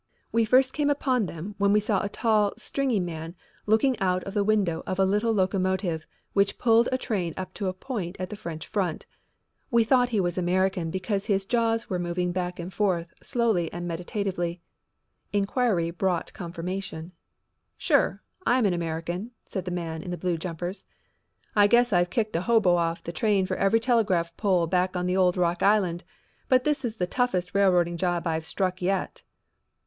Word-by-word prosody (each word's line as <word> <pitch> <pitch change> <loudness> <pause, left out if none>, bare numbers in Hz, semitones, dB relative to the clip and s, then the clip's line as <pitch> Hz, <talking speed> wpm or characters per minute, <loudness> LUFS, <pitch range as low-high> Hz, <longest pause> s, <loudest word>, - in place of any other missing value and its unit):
We 230 0 +3
first 260 +3 +4
came 295 -1 +1
upon 260 -7 +1
them 170 +6 -7
when 200 0 +3
we 210 - +5
saw 210 -2 0
a 200 - -2
tall, 215 -2 +2
stringy 265 -6 0
man 165 -1 -5 0.3
looking 220 +4 +3
out 185 -1 +1
of 195 - -7
the 205 -1 +2
window 195 -6 +1
of 185 - -2
a 195 - +4
little 210 +4 +1
locomotive 185 -4 0 0.3
which 200 0 +2
pulled 230 0 +4
a 255 - +2
train 185 -10 -2
up 185 0 -5
to 200 - -3
a 185 - -1
point 185 -3 -5
at 185 0 -5
the - - -4
French 170 -6 -7
front. 185 -6 -2 0.6
We 235 -1 +4
thought 245 +1 +3
he 220 -4 0
was 175 -1 0
an - - -1
American 185 -1 +1
because 195 +3 -2
his 195 -2 +1
jaws 230 +1 +1
were 180 - -2
moving 175 0 -1
back 180 0 -3
and 175 +2 -6
forth 175 -4 0
slowly 225 -10 0
and 175 0 -5
meditatively. 175 0 -3 0.7
Inquiry 200 -4 +1
brought 180 0 -1
confirmation. 175 -1 -5 0.7
"Sure, - - +1 0.2
I'm 245 -5 +3
an 195 - +3
American," 170 +4 -3 0.2
said 190 -3 -5
the - - -3
man 165 -2 -4
in 180 - -7
the 175 - -3
blue 180 -1 -1
jumpers. 175 +3 -5 0.7
"I 205 -1 +6
guess 240 0 +4
I've 175 0 +3
kicked 220 -2 -1
a 165 - +1
hobo 200 -4 +4
off 170 0 -1
the 170 - -5
train 195 +2 +1
for 185 0 -2
every 195 +4 +3
telegraph 200 -9 +1
pole 185 -5 +2
back 180 +2 0
on 180 - -1
the 180 0 0
old 180 -1 +3
Rock 175 -1 +1
Island, 195 -4 +2 0.5
but 255 -1 +4
this 300 0 0
is 230 -3 -2
the 180 - -1
toughest 185 -4 -1
railroading 180 -3 +3
job 175 -1 -1
I've 160 -1 -1
struck 185 -2 -1
yet." 190 +2 -1
185 Hz, 185 wpm, -26 LUFS, 175-215 Hz, 0.7 s, I